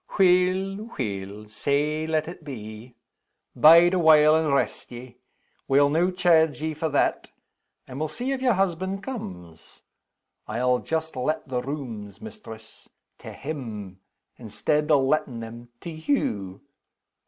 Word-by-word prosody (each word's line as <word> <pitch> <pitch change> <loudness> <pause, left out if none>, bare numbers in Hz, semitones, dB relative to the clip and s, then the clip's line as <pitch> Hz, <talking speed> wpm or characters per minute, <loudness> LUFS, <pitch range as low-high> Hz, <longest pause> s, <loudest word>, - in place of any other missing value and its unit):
"Weel! 190 +3 +2
weel! 100 -2 -5
sae 145 +8 -1
let 155 -1 0
it 170 -1 -9
be. 115 -3 -9 0.6
Bide 170 +3 +7
awhile, 155 -3 +6
and 160 -2 +1
rest 140 - -1
ye. 120 0 -10 0.5
We'll 140 +1 +4
no' 170 +4 +2
chairge 170 -4 +3
ye 155 +1 -2
for 155 +1 -2
that 145 - 0 0.6
and 130 +1 -8
we'll 155 - -1
see 245 - -4
if 270 -1 -2
your 250 -2 +3
husband 190 0 -1
comes. 90 - -9 0.6
I'll 125 +1 +1
just 160 -1 -3
let 130 +5 -2
the 125 -2 -2
rooms, 120 -8 -7
mistress, 205 - -12 0.3
to - - -9
him,, 110 -10 -7 0.4
instead 150 +7 -1
o' 150 -2 +5
lettin' 135 -3 0
them 115 +1 -9
to 170 - -6
_you. 105 - -2
150 Hz, 130 wpm, -25 LUFS, 120-170 Hz, 0.6 s, Bide